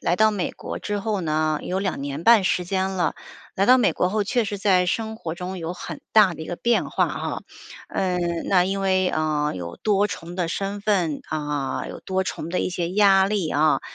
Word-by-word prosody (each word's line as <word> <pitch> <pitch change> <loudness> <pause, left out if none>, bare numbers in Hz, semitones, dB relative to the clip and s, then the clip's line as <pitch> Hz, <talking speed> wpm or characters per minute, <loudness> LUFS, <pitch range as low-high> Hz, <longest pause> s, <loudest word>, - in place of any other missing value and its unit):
来 175 - +1
到 215 0 +4
美 190 -4 -2
国 - - -7
之 205 0 -2
后 205 -1 -1
呢， 155 -1 0
有 185 - -2
2 190 -6 -2
年 145 +3 -5
半 230 -3 +7
时 180 -1 +1
间 190 +1 -1
了， 180 -3 0 0.4
来 195 - +2
到 255 +3 +6
美 240 - +3
国 180 - +1
后， 210 +2 0
确 240 +3 +1
实 205 -1 -4
在 185 -2 +3
生 220 +4 -1
活 170 -7 -6
中 185 +1 -5
有 170 +1 -4
很 180 - -7
大 205 -5 +5
的 160 - -8
一 - - -7
个 175 - -4
变 235 +5 +1
化 - - +2
哈。 - - -4 0.5
嗯， 185 -2 0 0.3
那 180 -2 +4
因 195 +1 -2
为， 185 -1 +2
呃， 150 -1 0
有 85 -2 -6
多 205 -1 +1
重 170 -2 -7
的 180 -2 -1
身 195 +3 -3
份 185 -8 0
啊， 145 -3 -2
有 - - -8
多 190 0 -1
重 165 - -5
的 180 - -1
一 - - -1
些 175 -1 -2
压 195 -1 +5
力 200 -5 -1
啊， 150 -2 +3
185 Hz, 230 characters per minute, -23 LUFS, 165-200 Hz, 0.5 s, 半